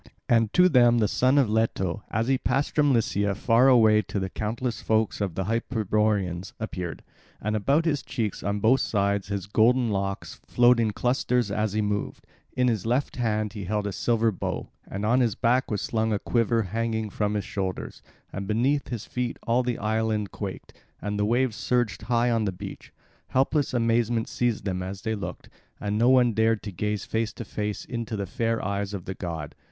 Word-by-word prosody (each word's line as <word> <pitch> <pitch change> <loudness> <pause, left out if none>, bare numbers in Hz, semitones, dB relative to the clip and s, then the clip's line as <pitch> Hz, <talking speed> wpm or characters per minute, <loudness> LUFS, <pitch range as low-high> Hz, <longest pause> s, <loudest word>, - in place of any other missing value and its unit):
And 115 -2 +3
to 180 0 +6
them 120 -7 +5
the 110 -2 +3
son 130 +6 +2
of 135 -4 +4
Leto, 105 -4 0
as 110 +2 -1
he 135 -1 +2
passed 135 +3 0
from 145 -2 +3
Lycia 105 -4 +1
far 115 +5 +4
away 110 -4 +6
to 100 0 -4
the 95 0 -3
countless 115 +3 -3
folk 110 -1 0
of 95 -5 -2
the 95 - -1
Hyperboreans, 105 -4 0
appeared; 90 -6 -5 0.4
and 105 +1 -2
about 140 +10 +2
his 150 -4 +1
cheeks 110 -6 -3
on 100 +1 -2
both 125 +5 +4
sides 100 -2 0
his 100 -2 -3
golden 115 +3 +3
locks 100 -1 -3
flowed 120 0 +4
in 115 -2 +2
clusters 120 0 0
as 105 0 -1
he 110 0 +1
moved; 105 0 -3 0.3
in 125 0 +2
his 110 -6 0
left 125 +4 0
hand 110 -3 -1
he 100 -3 -6
held 105 +2 -1
a 100 - -2
silver 115 +3 +1
bow, 95 - -4 0.2
and 100 +2 -4
on 120 +4 +3
his 115 -5 +2
back 125 +2 +2
was 105 -3 -2
slung 110 -1 0
a 105 - +2
quiver 115 +1 +1
hanging 110 +1 -2
from 105 +1 -1
his 100 -3 -2
shoulders; 95 -2 -4 0.3
and 100 0 -4
beneath 130 +7 +1
his 120 -4 -5
feet 125 -1 -3
all 120 +2 +2
the 125 -2 -2
island 110 -2 -1
quaked, - - -7 0.3
and 105 0 -3
the 105 - +2
waves 120 +1 +1
surged 120 -6 0
high 120 0 +1
on 115 -2 +1
the 100 - 0
beach. 90 - -9 0.4
Helpless 140 +2 +1
amazement 115 -1 +1
seized 120 -4 -1
them 95 -2 -2
as 95 +1 -6
they 110 - -1
looked; 100 -5 -6 0.3
and 105 +1 -1
no 120 +2 +5
one 125 -3 +5
dared 110 0 +2
to 105 - -5
gaze 105 +2 -2
face 110 0 -1
to 115 - -7
face 105 -2 -4
into 115 -2 -4
the 100 - -2
fair 115 +2 -1
eyes 100 0 -2
of 90 - -7
the 95 - -4
god. 80 -5 -5
110 Hz, 200 wpm, -26 LUFS, 100-120 Hz, 0.4 s, to